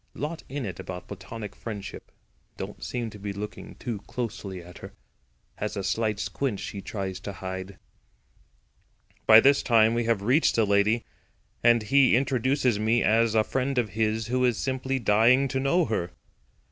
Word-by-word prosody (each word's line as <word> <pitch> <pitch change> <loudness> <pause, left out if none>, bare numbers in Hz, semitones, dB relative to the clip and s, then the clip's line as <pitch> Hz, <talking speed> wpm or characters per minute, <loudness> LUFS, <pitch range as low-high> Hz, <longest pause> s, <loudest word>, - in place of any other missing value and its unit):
Lot 155 +3 -4
in 140 -1 -4
it 90 -4 -6
about 90 -1 -7
platonic 110 -3 -8
friendship. 105 -4 -8 0.5
Don't - - -7
seem 120 -3 -3
to 105 - -11
be 100 0 -4
looking 105 +1 -7
too 115 -5 -5
closely 105 -6 -5
at 90 0 -12
her. - - -10 0.6
Has - - -3
a 100 - -2
slight 105 +2 0
squint 130 -8 -2
she 100 - -6
tries 95 -2 -5
to 100 +1 -6
hide." 95 +1 -6 1.5
By 110 0 +10
this 140 +2 +5
time 115 -1 +4
we 120 0 0
have 115 -3 +1
reached 130 +9 +3
the 115 - +3
lady, 105 +3 +2 0.6
and 120 -1 +5
he 135 +3 +4
introduces 130 -2 +1
me 110 +2 +2
as 115 +2 +3
a 110 - +5
friend 130 +3 -2
of 120 -3 +1
his 110 +2 0
who 125 +2 0
is 120 -3 +2
simply 130 0 -1
dying 120 +4 +4
to 130 +1 -1
know 160 +6 +2
her. 105 -6 -2
115 Hz, 170 wpm, -26 LUFS, 100-125 Hz, 1.5 s, By